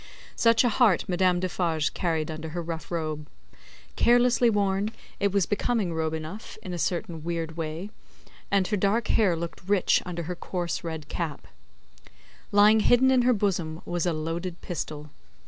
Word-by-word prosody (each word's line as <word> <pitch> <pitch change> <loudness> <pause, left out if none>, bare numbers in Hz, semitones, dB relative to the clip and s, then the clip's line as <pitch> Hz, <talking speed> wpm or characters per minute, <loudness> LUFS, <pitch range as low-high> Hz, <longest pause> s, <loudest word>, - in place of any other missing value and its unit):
Such 230 0 +4
a 245 - +3
heart 220 -5 +3
Madame 180 -1 +2
Defarge 170 -4 -1
carried 160 -3 -1
under 160 0 -6
her 170 +2 -4
rough 160 -2 -6
robe. 155 -3 -3 0.7
Carelessly 245 0 +4
worn, 200 -1 +1 0.3
it 200 -1 +2
was 195 -2 +2
a - - -24
becoming 205 -3 0
robe 160 0 -1
enough, 160 +7 -7
in 185 -4 -5
a 175 - -4
certain 170 0 -2
weird 165 -1 -3
way, 165 +5 -5 0.6
and 200 -1 +2
her 210 - +1
dark 205 +4 +1
hair 195 -6 +3
looked 170 0 -6
rich 200 -3 +3
under 175 -1 -5
her 180 +3 -4
coarse 175 -1 -3
red 160 -2 -5
cap. 160 -5 -4 1.1
Lying 210 +2 +6
hidden 245 +4 +4
in 255 -1 +4
her 250 +1 +4
bosom, 175 -6 -1
was 175 0 -1
a - - +2
loaded 165 +3 -4
pistol. 150 -3 -5
175 Hz, 165 wpm, -26 LUFS, 160-205 Hz, 1.1 s, Lying